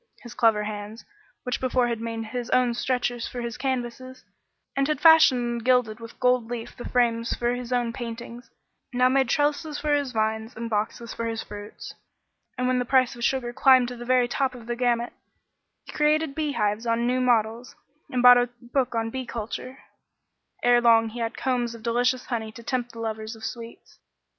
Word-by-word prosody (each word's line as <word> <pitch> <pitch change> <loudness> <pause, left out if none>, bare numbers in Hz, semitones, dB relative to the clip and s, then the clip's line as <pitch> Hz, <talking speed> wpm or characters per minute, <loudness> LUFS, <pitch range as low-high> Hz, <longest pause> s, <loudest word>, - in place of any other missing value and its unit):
His 240 -1 -9
clever 225 -3 +3
hands, 210 +1 -7 0.4
which 250 -1 -3
before 255 -1 +1
had 230 -2 -3
made 230 -1 -4
his 240 +2 -5
own 250 -1 +3
stretchers 245 -1 -1
for 245 - -7
his 235 0 -4
canvases, 255 -1 -4 0.5
and 275 0 +1
had 305 -3 -1
fashioned 320 -6 +7
and 235 -1 -3
gilded 245 -3 +2
with 230 0 -11
gold 250 -2 +2
leaf 240 -1 -6
the 240 - -7
frames 230 -2 +1
for 240 0 0
his 245 0 -6
own 240 -2 0
paintings, 235 0 -7 0.4
now 250 0 +3
made 265 -1 +2
trellises 295 +2 0
for 300 0 0
his 285 -3 0
vines 220 +1 -2
and 230 0 -5
boxes 220 +2 -2
for 230 - -3
his 225 -1 -3
fruits, 205 0 -9 0.6
and 250 0 0
when 255 0 +2
the - - +1
price 255 0 +2
of 240 - -8
sugar 240 -1 0
climbed 255 -1 +5
to 250 - -7
the 240 - -8
very 250 0 +3
top 260 +1 -1
of 235 -2 -11
the 240 +1 -3
gamut, 240 -1 0 0.7
he - - -10
created 300 0 +1
beehives 235 -8 -1
on 230 +1 +1
new 250 +1 +1
models, 235 0 0 0.3
and 250 -3 -1
bought 245 0 +9
a 245 0 0
book 250 0 -1
on 225 0 -1
bee 260 0 -5
culture; 235 +3 -6 0.8
ere 245 0 +5
long 225 -1 +5
he 235 +2 -8
had 230 0 -3
combs 245 -3 -1
of 225 - -13
delicious 245 +2 +1
honey 220 -3 -3
to 230 +1 -12
tempt 245 -1 -2
the 230 - -10
lovers 220 0 -4
of 220 0 -9
sweets. 230 -1 -9
240 Hz, 195 wpm, -25 LUFS, 230-255 Hz, 0.8 s, bought